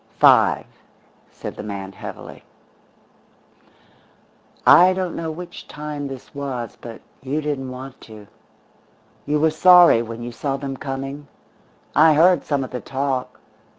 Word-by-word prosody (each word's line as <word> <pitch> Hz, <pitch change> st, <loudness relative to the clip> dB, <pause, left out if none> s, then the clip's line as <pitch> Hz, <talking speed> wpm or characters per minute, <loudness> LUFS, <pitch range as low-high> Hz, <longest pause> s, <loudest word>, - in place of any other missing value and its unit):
"Five," -, -, +5 dB, 0.6 s
said -, -, -8 dB
the -, -, -7 dB
man 100 Hz, -2 st, -6 dB
heavily. -, -, -10 dB, 2.2 s
"I 180 Hz, +2 st, +7 dB
don't 185 Hz, -2 st, -3 dB
know 165 Hz, -1 st, -4 dB
which 175 Hz, +3 st, -9 dB
time 150 Hz, -1 st, -6 dB
this 135 Hz, -2 st, -10 dB
was; 135 Hz, -5 st, -5 dB
but 115 Hz, -2 st, -10 dB, 0.2 s
you 135 Hz, +3 st, -2 dB
didn't 145 Hz, -3 st, -3 dB
want 130 Hz, +1 st, -9 dB
to. 110 Hz, -2 st, -13 dB, 1.0 s
You 150 Hz, +1 st, +1 dB
were 160 Hz, +1 st, +3 dB
sorry 175 Hz, -5 st, +6 dB
when 115 Hz, 0 st, -7 dB
you 120 Hz, -, -6 dB
saw 135 Hz, +3 st, -3 dB
them 135 Hz, -1 st, -5 dB
coming. 135 Hz, +2 st, -6 dB, 0.7 s
I 155 Hz, +1 st, +6 dB
heard 175 Hz, +4 st, +4 dB
some 140 Hz, -2 st, -1 dB
of 130 Hz, -, -8 dB
the 125 Hz, -, -5 dB
talk. 135 Hz, -1 st, -3 dB
140 Hz, 135 wpm, -21 LUFS, 125-155 Hz, 2.2 s, I